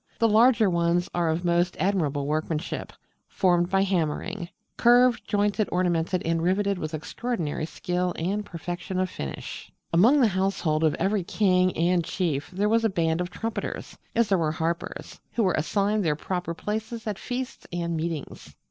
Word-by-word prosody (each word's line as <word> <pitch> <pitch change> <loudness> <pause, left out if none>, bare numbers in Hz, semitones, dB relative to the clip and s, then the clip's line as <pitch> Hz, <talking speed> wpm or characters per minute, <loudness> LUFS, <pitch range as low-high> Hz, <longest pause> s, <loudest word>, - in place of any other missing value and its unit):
The 230 - +3
larger 225 0 +5
ones 170 0 +1
are 170 -2 +1
of 165 +3 -1
most 175 +1 +1
admirable 155 -8 0
workmanship, 155 +2 -2 0.4
formed 175 -2 +2
by 195 0 +3
hammering; 175 0 -1 0.3
curved, 245 0 +5
jointed, 205 +1 +1
ornamented, 180 0 +1
and 165 0 +1
riveted 195 +2 +1
with 155 -1 -3
extraordinary 160 -2 -3
skill 180 +1 -2
and 195 +6 -1
perfection 175 0 -5
of 185 -1 0
finish. 70 -2 -7 0.2
Among 230 +13 +6
the 240 -5 +5
household 185 -5 0
of 155 - +3
every 195 +2 0
king 185 -2 +2
and 175 +1 +2
chief 160 -4 -2
there 200 +3 0
was 225 +1 +3
a 225 - +3
band 165 -2 0
of 180 - -3
trumpeters 225 +5 -5 0.2
as 230 -2 +3
there 195 -3 +3
were 155 -2 0
harpers 165 +2 -4
who 230 - +1
were 185 -3 +2
assigned 200 +6 +1
their 155 -3 +1
proper 175 +1 -3
places 220 +4 -4
at 210 -3 -3
feasts 255 0 -5
and 170 -1 -2
meetings. 160 -3 -5
180 Hz, 165 wpm, -26 LUFS, 165-205 Hz, 0.4 s, Among